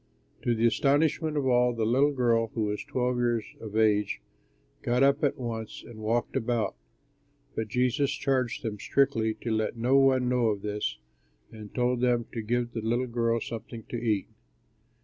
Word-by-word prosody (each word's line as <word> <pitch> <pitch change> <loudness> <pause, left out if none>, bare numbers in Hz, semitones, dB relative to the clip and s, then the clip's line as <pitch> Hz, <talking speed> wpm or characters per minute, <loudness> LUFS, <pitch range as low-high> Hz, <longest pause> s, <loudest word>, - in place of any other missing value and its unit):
To 120 - +1
the 115 +1 +1
astonishment 150 +6 +2
of 140 - 0
all, 125 -1 +3
the 115 -2 -1
little 135 +6 +3
girl 120 -4 +2
(who 110 - 0
was 105 0 -2
twelve 125 -1 -1
years 120 -3 +1
of 110 -1 -6
age) 105 -2 +2 0.6
got 125 +2 +2
up 140 +2 +3
at 145 0 +2
once 115 -3 -5
and 115 -2 -11
walked 115 +2 -1
about. 115 -1 0 0.8
But 110 - -3
Jesus 125 +4 +1
charged 130 -5 -1
them 105 -3 -4
strictly 115 -5 +1
to 115 - -2
let 110 +1 -1
no 125 +4 +3
one 130 -2 +4
know 125 -2 +2
of 105 -2 -1
this, 105 0 -2 0.5
and 105 -2 -10
told 125 0 +1
them 120 -2 +2
to 115 - -4
give 120 +2 -1
the 115 - -3
little 120 +3 0
girl 115 -1 0
something 115 0 -7
to 120 - -3
eat. 105 -4 +1
120 Hz, 175 wpm, -28 LUFS, 110-125 Hz, 0.8 s, one